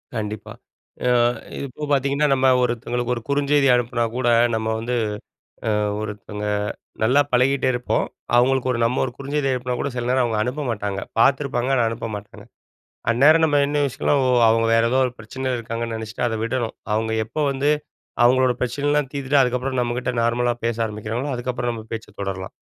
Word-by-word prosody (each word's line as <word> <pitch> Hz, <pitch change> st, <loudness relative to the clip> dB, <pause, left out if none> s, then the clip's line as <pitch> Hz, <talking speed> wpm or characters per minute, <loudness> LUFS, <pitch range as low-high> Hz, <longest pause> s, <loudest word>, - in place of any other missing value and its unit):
கண்டிப்பா. 105 Hz, -1 st, -5 dB, 0.6 s
ஆ -, -, +4 dB, 0.5 s
இப்போ 140 Hz, +3 st, -9 dB
பார்த்தீங்கன்னா, 140 Hz, +2 st, +2 dB
நம்ம 135 Hz, 0 st, +3 dB
ஒருத்தவங்களுக்கு 120 Hz, 0 st, -1 dB
ஒரு 120 Hz, -, -5 dB
குறுஞ்செய்தி 140 Hz, 0 st, +3 dB
அனுப்பினா 120 Hz, -1 st, 0 dB
கூட, 130 Hz, -1 st, 0 dB, 0.3 s
நம்ம 110 Hz, 0 st, -2 dB
வந்து 120 Hz, +2 st, -2 dB, 0.8 s
அ -, -, +1 dB, 0.3 s
ஒருத்தவங்க 105 Hz, 0 st, -5 dB, 0.6 s
நல்லா 125 Hz, +6 st, +4 dB
பழகிட்டே 130 Hz, +2 st, +3 dB
இருப்போம். 125 Hz, 0 st, 0 dB, 0.3 s
அவங்களுக்கு 130 Hz, +1 st, +3 dB
ஒரு 120 Hz, -, -2 dB
நம்ம 120 Hz, +3 st, +1 dB
ஒரு 125 Hz, -, -6 dB
குறுஞ்செய்தி 140 Hz, 0 st, -1 dB
அனுப்பினா 125 Hz, 0 st, -2 dB
கூட, 140 Hz, -, -1 dB
சில 120 Hz, -1 st, -2 dB
நேரம் 130 Hz, 0 st, +3 dB
அவங்க 115 Hz, -3 st, -1 dB
அனுப்ப 130 Hz, +6 st, -2 dB
மாட்டாங்க. 100 Hz, -3 st, -3 dB, 0.2 s
பார்த்துருப்பாங்க, 135 Hz, -1 st, +2 dB
ஆனா 120 Hz, -, +3 dB
அனுப்ப 115 Hz, 0 st, -5 dB
மாட்டாங்க. 100 Hz, 0 st, -11 dB, 0.7 s
அந்நேரம் 150 Hz, +7 st, +5 dB
நம்ம 145 Hz, -2 st, +2 dB
என்ன 145 Hz, 0 st, 0 dB
யோசிக்கணும்னா, 140 Hz, +1 st, 0 dB, 0.3 s
அவங்க 115 Hz, 0 st, +3 dB
வேறு 115 Hz, 0 st, +3 dB
ஏதோ 130 Hz, -, +3 dB
ஒரு 125 Hz, -, -4 dB
பிரச்சனை 130 Hz, +4 st, -4 dB
இருக்காங்கன்னு 115 Hz, 0 st, -4 dB
நெனைச்சிட்டு 110 Hz, +2 st, -3 dB
அத 110 Hz, -1 st, -2 dB
விடணும். 115 Hz, 0 st, -2 dB, 0.2 s
அவங்க 110 Hz, +1 st, -1 dB
எப்போ 120 Hz, +8 st, -4 dB
வந்து 140 Hz, +2 st, 0 dB, 0.6 s
அவங்களோட 130 Hz, 0 st, +4 dB
பிரச்சனைலாம் 145 Hz, +3 st, 0 dB
தீர்த்துட்டு, 140 Hz, 0 st, +2 dB
அதுக்கப்புறம் 125 Hz, +1 st, -1 dB
நம்மகிட்ட 120 Hz, +1 st, -1 dB
நார்மலா 120 Hz, +1 st, +1 dB
பேச 115 Hz, -1 st, 0 dB
ஆரம்பிக்கிறாங்களோ, 110 Hz, +6 st, -4 dB
அதுக்கப்புறம் 120 Hz, 0 st, -2 dB
நம்ம 110 Hz, -1 st, -7 dB
பேச்சை 110 Hz, -1 st, -6 dB
தொடரலாம். 95 Hz, -1 st, -4 dB
125 Hz, 160 wpm, -22 LUFS, 115-135 Hz, 0.8 s, அந்நேரம்